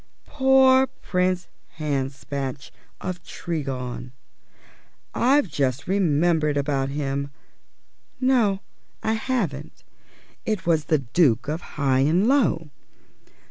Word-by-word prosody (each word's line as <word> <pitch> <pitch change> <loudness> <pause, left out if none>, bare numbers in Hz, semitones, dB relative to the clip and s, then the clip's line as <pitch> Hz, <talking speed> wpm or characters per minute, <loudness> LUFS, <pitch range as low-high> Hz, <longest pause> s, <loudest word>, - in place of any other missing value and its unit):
Poor 265 -1 +5
Prince 180 -4 -1 0.3
Hanspatch 140 -2 -3 0.3
of 180 -1 -5
Tregong; 130 -6 -5 1.0
I've 275 +1 +3
just 140 -3 -1
remembered 165 -5 +2
about 140 -1 0
him 140 0 -2 0.9
no, 240 -7 +2 0.4
I 220 - +1
haven't, 190 - -3 0.6
it 215 -4 -2
was 160 -3 +2
the 155 - +3
Duke 130 -2 +2
of 155 +3 -2 0.2
Highanlow. 160 - +2
155 Hz, 85 wpm, -24 LUFS, 140-200 Hz, 1.0 s, Poor